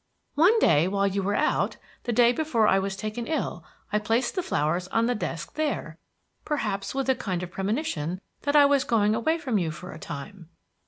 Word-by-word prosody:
One 360 +10 +5
day, 165 - +4
while 200 +1 +1
you 200 0 0
were 200 +2 0
out, 305 - +1 0.3
the 240 - 0
day 235 +1 +5
before 245 -7 +1
I 195 - +4
was 195 0 -2
taken 215 +3 -4
ill, 315 - -2 0.3
I 210 - +3
placed 225 +4 0
the 370 - -1
flowers 175 - -1
on 230 +4 +1
the 245 - +1
desk 170 -7 -4
there, 310 -1 -2 0.4
perhaps 210 -8 -2
with 270 -1 -1
a 265 - +5
kind 185 -8 -3
of 180 - -7
premonition 195 - -2 0.2
that 285 +1 0
I 290 -1 +8
was 280 -1 +3
going 215 -4 +2
away 275 +9 +1
from 255 -10 0
you 170 -3 -1
for 170 +4 -8
a 160 - -10
time." 165 +5 -8
215 Hz, 205 wpm, -26 LUFS, 190-270 Hz, 0.4 s, I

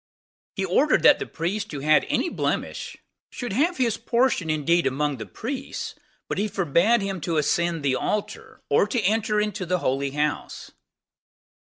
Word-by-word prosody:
He 195 - -1
ordered 265 - +3
that 290 - +7
the - - -4
priest 200 +6 -3
who 145 -3 -5
had 155 +2 +4
any 300 - +1
blemish, - - -3 0.3
should 245 -5 -5
have 330 - +1
his 235 -4 +1
portion 235 -7 +1
indeed 160 +2 +2
among 140 +1 -1
the 110 - -7
priests, 255 +4 -5 0.3
but - - -3
he 210 - +1
forbade 195 +4 +2
him 195 -3 -3
to 165 0 -1
ascend 165 +1 +1
the 135 -2 +2
altar, 210 +9 -4
or 145 - +3
to 240 +4 0
enter 215 +1 +1
into 210 -2 -2
the 180 +1 0
holy 140 -3 -1
house. 150 +1 -3
185 Hz, 165 wpm, -24 LUFS, 150-220 Hz, 0.3 s, that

